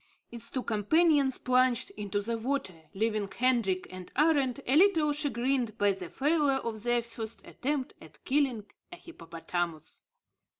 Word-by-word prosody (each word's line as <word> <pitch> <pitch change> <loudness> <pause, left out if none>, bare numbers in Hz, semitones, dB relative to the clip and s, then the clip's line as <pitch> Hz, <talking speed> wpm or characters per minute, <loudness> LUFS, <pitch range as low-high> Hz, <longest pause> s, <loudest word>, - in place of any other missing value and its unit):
Its 235 -1 -7
two 255 - -3
companions 275 - +2
plunged 255 -1 +2
into 205 -1 -3
the 230 +3 0
water, 220 - -4
leaving 215 0 0
Hendrik 235 -7 +1
and 185 -1 -9
Arend 285 -4 +2
a 260 - +2
little 320 -4 +4
chagrined 255 -5 -1
by 205 -2 +3
the 190 -3 -6
failure 290 -1 +2
of 225 -4 -5
their 240 +1 +1
first 225 -1 -6
attempt 275 -1 -3
at 155 -1 -16
killing 260 -6 +1 0.3
a - - -7
hippopotamus. 170 - -6
240 Hz, 140 wpm, -29 LUFS, 205-280 Hz, 0.3 s, little